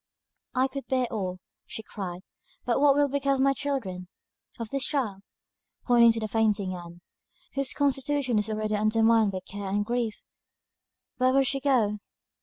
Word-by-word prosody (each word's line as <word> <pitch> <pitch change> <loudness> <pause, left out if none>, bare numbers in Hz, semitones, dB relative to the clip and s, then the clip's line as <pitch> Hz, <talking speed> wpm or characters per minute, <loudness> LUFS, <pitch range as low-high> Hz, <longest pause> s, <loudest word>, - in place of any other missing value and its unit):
"I 260 +1 +3
could 275 +1 -7
bear 255 -1 +1
all," 185 -4 -2 0.3
she 220 - -6
cried; 185 -4 -6 0.4
"but 245 +2 +1
what 285 -1 +6
will 290 0 +4
become 275 0 +1
of 265 - 0
my 275 0 +4
children? 235 -12 -3 0.5
Of 230 -2 -4
this 275 -1 +1
child," 235 -11 -1 0.6
pointing 235 -2 +6
to 225 - -2
the 215 - -2
fainting 210 -3 +1
Ann, 175 -1 -9 0.5
"whose 275 -2 0
constitution 275 -3 +1
is 210 - -2
already 215 0 -2
undermined 220 0 +3
by 185 -1 -4
care 200 0 -5
and 205 +1 0
grief 235 -2 -1 1.0
where 255 0 +3
will 275 0 +5
she 275 +1 0
go?" 240 -7 +2
230 Hz, 165 wpm, -27 LUFS, 205-270 Hz, 1.0 s, what